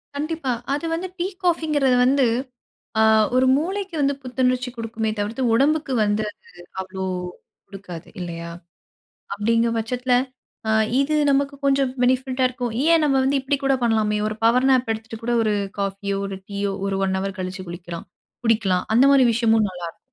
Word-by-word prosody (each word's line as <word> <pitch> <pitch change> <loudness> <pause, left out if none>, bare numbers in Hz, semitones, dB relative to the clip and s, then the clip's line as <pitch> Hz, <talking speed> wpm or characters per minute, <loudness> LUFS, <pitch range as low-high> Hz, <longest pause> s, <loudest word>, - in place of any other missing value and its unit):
கண்டிப்பா. 300 -2 -2 0.2
அது 295 +3 -2
வந்து 350 +3 -2
டீ 345 - 0 0.2
காஃபிங்கிறது 305 -7 +2
வந்து, 270 +1 +3 0.8
அ - - +6 0.3
ஒரு 260 0 +4
மூளைக்கு 380 +4 -3
வந்து 280 0 +2
புத்துணர்ச்சி 250 0 0
கொடுக்குமே 225 -1 -3
தவிர்த்து, 215 +5 -2
உடம்புக்கு 290 +3 +2
வந்து 205 +1 +1
அது - - -25 0.4
அவ்வளோ 190 0 -6 0.6
கொடுக்காது 185 -4 -9
இல்லையா. 170 -1 -6 0.8
அப்படிங்கிற 230 +3 +1
பட்சத்தில, 250 +3 -1 0.6
அ - - +3 0.3
இது 300 +2 0 0.2
நமக்கு 280 +1 +1
கொஞ்சம் 275 -1 +2
பெனிஃபிட்டா 260 +1 +1
க - - +6
இருக்கும். 245 -2 -4
ஏன் 330 -1 +5
நம்ம 275 -2 +2
வந்து 275 +1 +2
இப்படி 275 +2 0
கூட 270 0 +3
பண்ணலாமே 215 -2 +1
ஒரு 215 - -3
பவர் 250 +3 +4
நாப் 250 -3 +2
எடுத்துட்டு 220 0 -8
கூட 240 +1 0
ஒரு 215 -1 +1 0.3
காஃபியோ 200 0 -2
ஒரு 195 -1 -6
டீயோ 200 0 -2
ஒரு 195 0 -1
1 190 0 0
ஹவர் 195 0 -4
கழிச்சு 185 +1 -5
குளிக்கலாம். 175 0 -8 0.4
குடிக்கலாம். 210 -5 +2
அந்த 245 +4 +6
மாதிரி 270 -2 +6
விஷயமும் 225 -2 +3
நல்லாயிருக்கும். 175 -2 -8
235 Hz, 160 wpm, -22 LUFS, 200-275 Hz, 0.8 s, அ